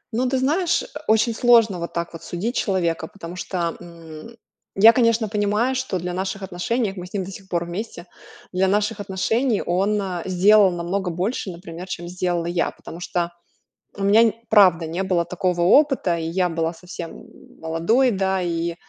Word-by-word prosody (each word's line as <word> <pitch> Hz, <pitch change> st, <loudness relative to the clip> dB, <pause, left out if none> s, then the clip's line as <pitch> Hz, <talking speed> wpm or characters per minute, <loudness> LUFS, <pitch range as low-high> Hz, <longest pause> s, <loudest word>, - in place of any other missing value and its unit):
Ну, 250 Hz, +1 st, +1 dB
ты 265 Hz, -, 0 dB
знаешь, 320 Hz, +7 st, +1 dB
э, -, -, -8 dB, 0.2 s
очень 220 Hz, +2 st, +3 dB
сложно 225 Hz, -5 st, +4 dB
вот 170 Hz, -, -5 dB
так 170 Hz, 0 st, -3 dB
вот 165 Hz, -, -9 dB
судить 215 Hz, +8 st, -4 dB
человека, 170 Hz, -4 st, 0 dB
потому 175 Hz, -2 st, -10 dB
что, 175 Hz, -2 st, -3 dB
м, 170 Hz, +4 st, -12 dB, 0.4 s
я, 220 Hz, +4 st, +8 dB
конечно, 230 Hz, -2 st, +2 dB
понимаю, 210 Hz, +4 st, 0 dB
что 260 Hz, -7 st, -2 dB
для 180 Hz, +1 st, -4 dB
наших 190 Hz, +1 st, -4 dB
отношений, 195 Hz, +4 st, -1 dB
а -, -, -11 dB
мы 180 Hz, -1 st, -7 dB
с 180 Hz, -, -19 dB
ним 195 Hz, -, -1 dB
до 190 Hz, -, -8 dB
сих 190 Hz, 0 st, -12 dB
пор 170 Hz, -1 st, -1 dB
вместе, 175 Hz, 0 st, -6 dB, 0.5 s
для 190 Hz, +1 st, +1 dB
наших 210 Hz, +2 st, 0 dB
отношений 210 Hz, +4 st, 0 dB
он, 195 Hz, +4 st, +1 dB
э, 185 Hz, -3 st, -3 dB
сделал 195 Hz, +2 st, +5 dB
намного 180 Hz, +2 st, -2 dB
больше, 190 Hz, +5 st, -2 dB
например, 170 Hz, 0 st, -9 dB
чем 175 Hz, -1 st, -6 dB
сделала 175 Hz, -1 st, -2 dB
я. 170 Hz, 0 st, 0 dB
Потому 165 Hz, -, -11 dB
что 175 Hz, -1 st, -2 dB, 0.7 s
у 200 Hz, -, -5 dB
меня 205 Hz, +4 st, +5 dB
нь 225 Hz, -, +3 dB, 0.2 s
правда 180 Hz, -6 st, +5 dB
не 175 Hz, +4 st, -2 dB
было 180 Hz, -2 st, +1 dB
такого 180 Hz, 0 st, -2 dB
опыта, 225 Hz, -, +3 dB
и 165 Hz, -, -4 dB
я 180 Hz, +2 st, 0 dB
была 165 Hz, -1 st, -1 dB
совсем, 170 Hz, 0 st, -8 dB
м, -, -, -13 dB, 0.3 s
молодой, 170 Hz, +11 st, +2 dB
да. 190 Hz, -2 st, 0 dB
И 170 Hz, -1 st, -2 dB
185 Hz, 185 wpm, -22 LUFS, 175-215 Hz, 0.7 s, я